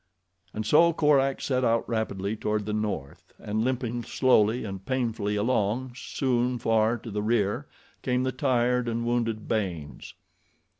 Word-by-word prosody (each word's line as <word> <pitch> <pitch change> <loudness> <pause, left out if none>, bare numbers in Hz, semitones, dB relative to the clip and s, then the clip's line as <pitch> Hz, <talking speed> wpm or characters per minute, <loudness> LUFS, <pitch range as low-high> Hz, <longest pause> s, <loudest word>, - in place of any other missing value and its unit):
And 110 - -4
so 170 +8 +5
Korak 140 -3 +2
set 130 -2 0
out 115 -1 +2
rapidly 110 -3 -2
toward 105 -1 -2
the 105 - -3
North, 105 -10 -4
and 110 +2 -2
limping 120 -1 -1
slowly 120 -2 +2
and 95 -2 -6
painfully 115 -4 -1
along, 115 +3 0
soon 125 -1 -1
far 115 0 +2
to 115 0 -9
the 105 +1 -2
rear, 105 -2 0 0.3
came 125 0 0
the 130 - 0
tired 125 -2 +1
and 115 0 -2
wounded 115 -2 -1
Baynes. 90 -9 -3
115 Hz, 145 wpm, -27 LUFS, 105-125 Hz, 0.3 s, so